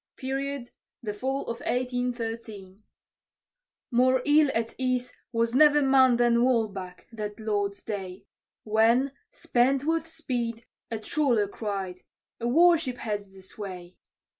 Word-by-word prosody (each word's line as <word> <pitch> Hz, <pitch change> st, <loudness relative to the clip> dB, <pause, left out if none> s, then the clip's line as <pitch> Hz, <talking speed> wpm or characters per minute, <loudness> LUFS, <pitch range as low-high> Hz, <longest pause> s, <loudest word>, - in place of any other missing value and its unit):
Period, 270 Hz, -1 st, -4 dB, 0.3 s
the 210 Hz, -2 st, -3 dB
fall 265 Hz, +6 st, -2 dB
of 235 Hz, 0 st, -5 dB
1813._ 230 Hz, -6 st, -3 dB, 1.1 s
More 255 Hz, +1 st, +3 dB
ill 295 Hz, 0 st, +5 dB
at 230 Hz, 0 st, -1 dB
ease 255 Hz, -1 st, -1 dB, 0.2 s
was 230 Hz, 0 st, 0 dB
never 295 Hz, +2 st, +6 dB
man 265 Hz, -2 st, +5 dB
than 240 Hz, -1 st, +3 dB
Walbach, 210 Hz, -7 st, -1 dB
that 210 Hz, -2 st, -6 dB
Lord's 205 Hz, -2 st, -2 dB
day, 190 Hz, -3 st, -6 dB, 0.4 s
When, 230 Hz, +5 st, +3 dB, 0.2 s
spent 260 Hz, +3 st, +1 dB
with 325 Hz, +1 st, 0 dB
speed, 240 Hz, -8 st, -4 dB, 0.2 s
a 225 Hz, -, -3 dB
trawler 235 Hz, -2 st, +1 dB
cried, 195 Hz, -3 st, -4 dB, 0.4 s
"A 235 Hz, -, -2 dB
war 335 Hz, +6 st, +6 dB
ship 255 Hz, -6 st, -4 dB
heads 205 Hz, -4 st, -4 dB
this 190 Hz, +2 st, -15 dB
way!" 185 Hz, -3 st, -8 dB
235 Hz, 125 wpm, -27 LUFS, 210-260 Hz, 1.1 s, never